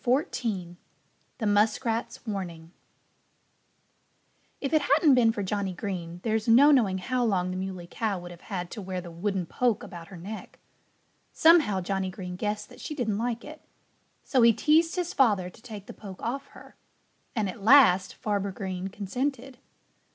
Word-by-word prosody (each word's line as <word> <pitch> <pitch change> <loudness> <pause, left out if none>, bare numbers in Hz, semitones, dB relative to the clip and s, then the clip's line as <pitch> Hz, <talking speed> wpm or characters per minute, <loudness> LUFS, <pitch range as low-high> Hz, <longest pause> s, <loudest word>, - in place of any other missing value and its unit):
XIV 230 - -1 0.6
THE 225 - -3
MUSKRATS' 225 +4 0
WARNING 175 -6 -5 1.9
If 275 +2 -3
it 310 - +5
hadn't 285 +1 +4
been 240 -3 +5
for 215 -3 -3
Johnnie 195 -1 -2
Green 175 -3 -5
there's 220 -1 0
no 265 +6 +7
knowing 215 -9 +3
how 250 +6 -1
long 185 -5 +1
the - - -4
Muley 185 -2 -5
Cow 205 +2 -2
would 175 0 -9
have 175 - -12
had 180 -3 -5
to 215 - -6
wear 185 -1 -4
the 175 -1 -9
wooden 185 +2 -2
poke 235 +6 0
about 170 -2 -9
her 190 - -11
neck. 205 +6 -8 0.8
Somehow 315 - +5
Johnnie 190 +1 -2
Green 180 -1 -7
guessed 210 +2 -3
that 250 - -14
she 300 - -5
didn't 220 -7 -1
like 235 0 -2
it. 310 0 -10 0.6
So 260 - +2
he 230 0 +7
teased 315 - +3
his 355 -2 -2
father 205 -9 +2
to 220 - -19
take 210 -4 -9
the - - -9
poke 195 -4 -11
off 270 +4 -3
her. - - -15 0.6
And 215 -3 0
at 195 +3 -7
last 210 -5 +6
Farmer 200 -2 -2
Green 190 -1 -4
consented. 250 +6 -4
210 Hz, 165 wpm, -27 LUFS, 185-245 Hz, 1.9 s, no